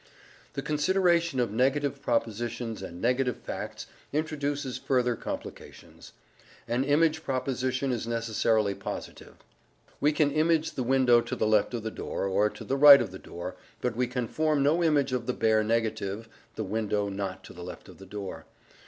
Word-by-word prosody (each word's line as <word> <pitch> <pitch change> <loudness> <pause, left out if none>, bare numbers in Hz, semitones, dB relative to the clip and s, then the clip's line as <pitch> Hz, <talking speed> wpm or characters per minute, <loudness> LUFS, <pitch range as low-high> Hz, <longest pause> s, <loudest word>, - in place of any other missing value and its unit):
The - - -4
consideration 170 -1 +2
of 120 -4 +1
negative 135 +4 +1
propositions 115 -1 -2
and 85 - -8
negative 125 +2 +1
facts - - -6 0.3
introduces 145 -3 -2
further 125 -2 +1
complications. - - -8 0.5
An 120 +3 +1
image 155 +2 +2
proposition 130 0 -1
is 115 -2 -2
necessarily 115 -2 +1
positive: - - -7 0.6
we 150 - +3
can 150 -1 +2
image 160 +1 +2
the - - -4
window 125 -1 +4
to - - -4
the - - 0
left 110 +2 +2
of 115 - -4
the 110 - -3
door, - - -4
or 100 +2 +2
to 115 - -10
the 135 +5 -1
right 140 0 +10
of - - -2
the 95 - -9
door, 85 +2 -7 0.2
but 125 -1 -2
we 125 +1 +1
can 125 -1 -2
form 155 +1 +1
no 160 +5 +3
image 145 -5 +2
of 125 -2 -2
the 125 - +1
bare 110 -2 +2
negative 110 -1 -1 0.3
"the - - -3
window 105 -2 -1
not 95 -1 -4
to - - -12
the 90 - -9
left 90 - -9
of - - -14
the 95 - -12
door." 100 0 -7
125 Hz, 170 wpm, -28 LUFS, 110-145 Hz, 0.6 s, right